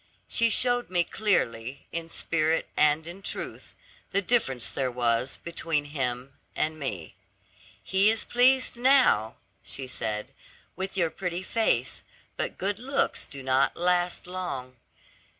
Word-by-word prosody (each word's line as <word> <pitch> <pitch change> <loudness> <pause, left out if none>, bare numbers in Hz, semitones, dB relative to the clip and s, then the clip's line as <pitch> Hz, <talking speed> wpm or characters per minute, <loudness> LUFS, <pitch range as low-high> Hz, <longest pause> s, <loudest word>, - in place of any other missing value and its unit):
She 230 -1 +3
showed 245 +2 +3
me 175 -1 +3
clearly, 135 - -1
in 165 0 -4
spirit 165 -1 0
and 150 +1 +3
in 175 +3 -9
truth, - - -6 0.3
the 200 - +2
difference 135 - +1
there 130 -2 -1
was 120 +1 0
between 165 -3 -2
him 130 -1 -2 0.2
and 155 0 -1
me. 95 - -4 0.7
'He 195 +2 +3
is 225 0 0
pleased 255 +2 +3
now,' 245 - +4 0.3
she 135 - -4
said, 105 -4 -4 0.4
'with 190 +1 -4
your 170 -3 +2
pretty 180 -1 -4
face; 190 - 0 0.3
but - - -2
good 200 +2 -1
looks 275 +3 +1
do 140 -1 -8
not 130 +1 +2
last 175 0 +1
long. 175 -9 -5
165 Hz, 135 wpm, -27 LUFS, 130-195 Hz, 0.7 s, now